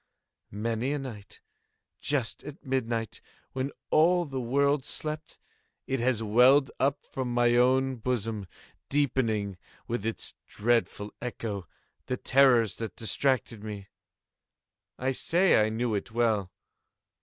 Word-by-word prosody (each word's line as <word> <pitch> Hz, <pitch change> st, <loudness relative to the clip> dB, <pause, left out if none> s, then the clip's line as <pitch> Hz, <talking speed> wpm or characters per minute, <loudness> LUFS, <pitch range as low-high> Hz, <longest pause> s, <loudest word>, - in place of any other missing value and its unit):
Many 115 Hz, +6 st, -2 dB
a -, -, 0 dB
night, 110 Hz, -7 st, -8 dB, 0.6 s
just 135 Hz, -6 st, -1 dB
at 150 Hz, +2 st, -10 dB
midnight, 115 Hz, -4 st, -2 dB, 0.3 s
when 130 Hz, +2 st, -2 dB, 0.2 s
all 175 Hz, +3 st, +4 dB
the 135 Hz, -3 st, -4 dB
world 140 Hz, +3 st, +2 dB
slept, 155 Hz, +2 st, -4 dB, 0.5 s
it 135 Hz, 0 st, -1 dB
has 120 Hz, -2 st, +1 dB
welled 125 Hz, +6 st, +5 dB
up 140 Hz, +1 st, +1 dB
from 130 Hz, -2 st, -4 dB
my 120 Hz, 0 st, +3 dB
own 130 Hz, +1 st, +3 dB
bosom, 115 Hz, -4 st, -2 dB, 0.4 s
deepening, 115 Hz, -9 st, 0 dB, 0.3 s
with 115 Hz, -3 st, -2 dB
its 115 Hz, 0 st, -3 dB
dreadful 110 Hz, -2 st, 0 dB
echo, 110 Hz, -6 st, -4 dB, 0.4 s
the 125 Hz, -, -1 dB
terrors 125 Hz, -7 st, +4 dB
that 110 Hz, -5 st, -5 dB
distracted 115 Hz, 0 st, 0 dB
me. 105 Hz, -2 st, -7 dB, 1.1 s
I 130 Hz, +1 st, 0 dB
say 170 Hz, -, +3 dB
I 110 Hz, -, +1 dB
knew 115 Hz, +1 st, -1 dB
it 100 Hz, -, -2 dB
well. 110 Hz, -5 st, +1 dB
120 Hz, 120 wpm, -28 LUFS, 110-135 Hz, 1.1 s, welled